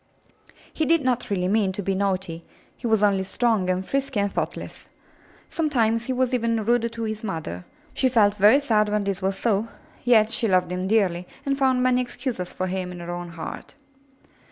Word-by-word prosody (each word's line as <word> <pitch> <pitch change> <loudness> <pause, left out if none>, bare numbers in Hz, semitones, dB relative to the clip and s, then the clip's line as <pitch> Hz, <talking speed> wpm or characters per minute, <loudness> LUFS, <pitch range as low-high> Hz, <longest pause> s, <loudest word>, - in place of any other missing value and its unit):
He 315 - -1
did 330 -2 +3
not 250 -1 0
really 180 -3 0
mean 200 -1 +1
to 200 - -4
be 195 - 0
naughty 185 -4 -2 0.2
— - - -33
he 245 - -5
was 220 -2 +2
only 200 -2 +3
strong 200 -1 0
and 185 +1 -1
frisky 275 -4 -1
and 200 -1 0
thoughtless. - - -5 0.6
Sometimes 235 -8 +1
he 260 - 0
was 255 0 0
even 230 -2 +1
rude 235 0 +2
to 230 0 -5
his 220 0 -4
mother. 160 - -5 0.3
She 260 - +2
felt 215 -5 +4
very 210 +6 +5
sad 215 -6 +2
when 210 0 0
this 195 -1 -2
was 195 +1 -1
so; 215 0 0 0.4
yet 225 -3 +4
she 230 0 0
loved 180 -2 +2
him 180 +1 -2
dearly 185 -4 +1 0.2
and 275 -1 +1
found 260 -2 +2
many 255 0 +3
excuses 240 -6 -4
for 185 - -3
him 185 -1 -3
in 180 - -8
her 175 0 -6
own 175 0 -5
heart. 170 -1 -8
210 Hz, 200 wpm, -24 LUFS, 185-245 Hz, 0.6 s, very